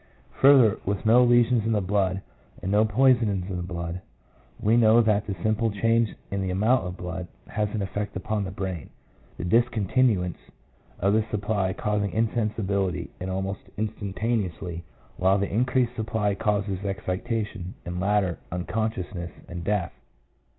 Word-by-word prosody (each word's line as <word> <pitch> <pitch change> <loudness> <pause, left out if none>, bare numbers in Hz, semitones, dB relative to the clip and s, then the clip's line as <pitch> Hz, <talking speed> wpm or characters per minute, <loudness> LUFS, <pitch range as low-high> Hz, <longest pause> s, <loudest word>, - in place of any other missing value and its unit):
Further, 130 -6 +6
with 100 +2 -2
no 120 +3 +6
lesions 120 -1 +4
in 115 +1 +1
the 105 - +2
vessels 95 -1 0 0.4
and 95 - -1
no 105 +2 +4
poison 120 +1 +4
in 95 -2 -1
the 90 - -3
blood, 85 0 -4 0.6
we 110 +2 +3
know 115 -1 +6
that 105 -3 +2
the 100 - -2
simple 110 +1 +2
change 115 +2 +1 0.2
in 100 0 -1
the 95 - -1
amount 105 +4 +2
of 90 0 -6
blood 90 0 -5 0.2
has 105 -1 -1
an 105 -1 -2
effect 100 +1 -4
upon 105 +2 -2
the 95 - -4
brain, 95 -5 -5 0.5
the - - -5
discontinuance 110 -2 +2 0.6
of 100 +2 +2
the 110 0 +3
supply 105 -3 0
causing 105 0 -1
insensibility 105 -4 -1
almost 95 +1 -3 0.2
instantaneously, 100 -4 -2 0.3
while 95 +2 +3
the 100 0 -2
increased 125 +1 +1
supply 110 -2 0
causes 100 -1 -1
excitation, 100 0 -3
and, 90 +1 -4
later, 95 -2 +1
unconsciousness 90 -1 -3 0.2
and 85 0 -6
death. 100 -3 -1
105 Hz, 145 wpm, -26 LUFS, 95-110 Hz, 0.6 s, Further